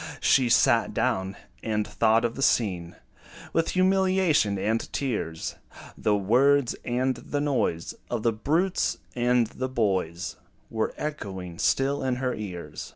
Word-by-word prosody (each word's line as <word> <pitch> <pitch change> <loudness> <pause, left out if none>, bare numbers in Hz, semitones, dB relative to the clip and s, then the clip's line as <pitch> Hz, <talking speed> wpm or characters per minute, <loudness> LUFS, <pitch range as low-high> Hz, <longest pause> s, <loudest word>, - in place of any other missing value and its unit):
She 130 -3 +3
sat 120 - +3
down, 95 +1 0 0.3
and 105 -2 -1
thought 115 +1 +2
of 115 - -1
the 135 - -6
scene 90 -10 +1 0.6
With 165 0 +1
humiliation 185 - +3
and 110 +4 -1
tears: 105 - -3 0.4
The 105 - +1
words, 125 +6 +3
and 125 +1 0
the 145 - -4
noise 135 - -1 0.2
Of 120 -3 -2
the 115 - +2
brutes 160 - 0 0.2
and 120 -1 +3
the 130 +4 -5
boys 95 -8 -1 0.3
Were 110 -1 -1
echoing 95 - -5
still 135 +1 +1
in 130 -1 0
her 125 0 -1
ears. 90 -8 -7
120 Hz, 135 wpm, -26 LUFS, 100-135 Hz, 0.6 s, She